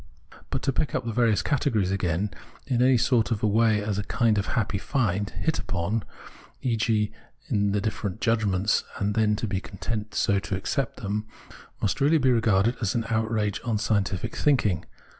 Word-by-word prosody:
But - - -2
to 135 - +1
pick 150 - -1
up 125 - -1
the 115 - -2
various 115 -2 +2
categories 115 -10 +1
again 95 +1 0 0.3
in 125 -2 0
any 130 0 +5
sort 115 -1 +2
of 115 -2 -2
way 110 0 +3
as 105 -1 -1
a - - -2
kind 110 0 +2
of 100 - -2
happy 100 -3 0
find, 105 -6 0
hit 160 - -1
upon, 95 +5 -1 0.6
e.g. 110 -3 +1 0.4
in 100 -5 +2
the 105 - +1
difierent 105 -1 -3
judgments, 110 -4 +1
and 105 0 0
then 105 -1 +2
to 110 - -3
be 100 -3 -2
content 105 +2 -5
so 100 -2 +2
to 95 - -3
accept 130 +7 -2
them, 105 +2 -2 0.6
must 100 - 0
really 150 +4 +5
be 130 -3 +3
regarded 115 -1 +2
as 105 -4 0
an 115 -1 0
outrage 110 -2 0
on 115 -3 0
scientific 100 -3 -1
thinking. 110 - +2
110 Hz, 180 wpm, -26 LUFS, 100-115 Hz, 0.6 s, any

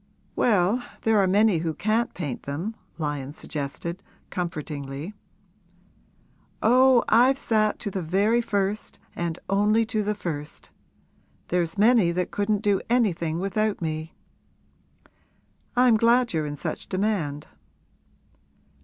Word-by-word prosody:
'Well, 210 +1 +2 0.2
there 220 -1 +3
are 195 - +3
many 200 -1 +3
who 160 -1 -2
can't 220 +7 0
paint 145 -8 -4
them,' 160 +11 -4 0.2
Lyon 145 -3 -3
suggested, 155 +4 -5 0.3
comfortingly. 150 -1 -5 1.5
'Oh, 255 +1 +5
I've 250 +4 +5
sat 215 -4 +1
to 205 - -3
the 190 - -3
very 200 +8 +2
first 205 -2 -2 0.2
and 170 -2 -3
only 210 +3 +3
to 220 -1 -1
the 210 +1 -1
first! 150 -6 -6 0.8
There's 170 -1 0
many 215 -4 +5
that 180 0 -2
couldn't 205 0 0
do 200 -3 +2
anything 175 -10 +1
without 205 +3 -1
me.' 160 -1 -4 1.6
'I'm 245 -2 +5
glad 235 +1 +3
you're 155 -2 -1
in 145 - -4
such - - -5
demand.' 185 -8 -1
195 Hz, 120 wpm, -25 LUFS, 160-220 Hz, 1.6 s, Oh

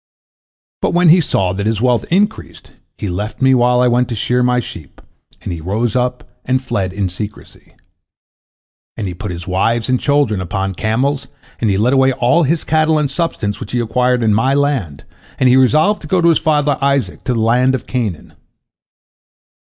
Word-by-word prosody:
But - - 0
when 175 -1 +4
he 175 +3 +6
saw 95 - 0
that 100 +2 -3
his 110 -2 0
wealth 120 0 +1
increased, 205 +5 -2 0.3
he 105 - -4
left 100 +4 -4
me 130 0 +4
while 125 0 +3
I 125 - +3
went 125 0 +1
to 120 - -3
shear 125 +4 0
my 125 0 +2
sheep, 80 - -9 0.4
and - - -4
he 85 - -7
rose 105 +7 -2
up 125 0 -1 0.2
and 130 +1 0
fled 100 -7 -3
in 95 0 -2
secrecy. 105 +4 -9 1.2
And 105 - -4
he 90 - -4
put 95 +4 -7
his 90 0 -6
wives 110 +6 0
and 130 -1 +2
children 140 -9 +1
upon 95 +2 -3
camels, 125 +8 -1 0.3
and 110 - 0
he 95 - +1
led 120 +6 +2
away 135 -1 +3
all 125 +8 +2
his 160 +1 0
cattle 155 0 +2
and 145 -2 -1
substance 110 -11 -2
which 100 - -8
he 125 - +1
acquired 125 +2 0
in 110 -2 +2
my 130 +6 +2
land, 135 - -1 0.4
and 130 - +3
he 125 - +5
resolved 155 +11 +3
to 150 - -9
go 185 +3 +1
to 170 0 +4
his 165 - +3
father 150 -2 +1
Isaac, 140 -1 -1
to 125 - 0
the - - -1
land 125 +4 +2
of 130 - -6
Canaan. 110 -11 -4
125 Hz, 195 wpm, -16 LUFS, 105-140 Hz, 1.2 s, he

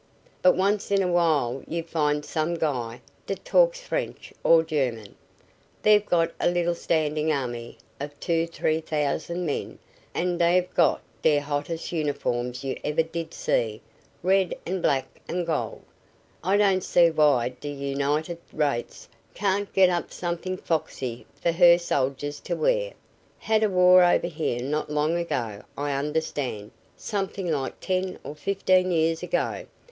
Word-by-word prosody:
But 180 - +5
once 200 +2 +1
in 200 -1 +3
a - - 0
while 155 -7 +2
you 165 +1 -3
find 150 -3 0
some 160 +2 -1
guy 125 -8 -2 0.3
dat - - -4
talks - - +4
French - - -4
or 165 -1 +6
German. 125 -10 -2 0.7
Dey've 210 -1 +5
got 165 -1 +2
a - - +3
little 175 0 +1
standin' 155 -2 0
army 120 -5 -3 0.2
of 145 +1 -7
two 165 -1 0
t'ree 160 -1 -1
t'ousand 155 +3 -2
men 145 - -3 0.4
an' 175 0 0
dey've 175 +1 +2
got - - +3 0.2
de 150 -2 +4
hottest 145 +3 -3
uniforms 125 -6 -2
you 135 - -3
ever 150 +2 +1
did 165 0 -5
see 110 -2 -1 0.4
red 190 0 +2
an' 185 +1 -2
black 135 -3 -1
an' 175 0 -1
gold. 165 - -2 0.6
I 190 +4 +3
don't 195 -3 +3
see 170 -1 +4
why 145 -6 +3
d' 135 +3 -10
United 145 +4 -2
Rates 145 -6 -2 0.3
can't 200 +1 0
get 185 -1 +5
up 175 -1 -2
somethin' 175 +1 -3
foxy 130 -8 -3
fer 170 - 0
her 170 0 +7
soldiers 145 -3 -2
to - - -3
wear. - - +1 0.4
Had 220 0 +1
a 215 - +3
war 180 -1 +6
over 175 -1 +3
here 155 -8 -2
not 150 +3 -2
long 150 +2 +1
ago, 120 -12 -2 0.2
I 145 0 -1
understand 140 -6 -2 0.3
somethin' 195 -3 -3
like 135 -3 -2
ten 185 0 -1
or - - -6
fifteen 185 +2 +1
years 165 -1 +1
ago. 180 -1 -2
165 Hz, 150 wpm, -26 LUFS, 145-180 Hz, 0.7 s, her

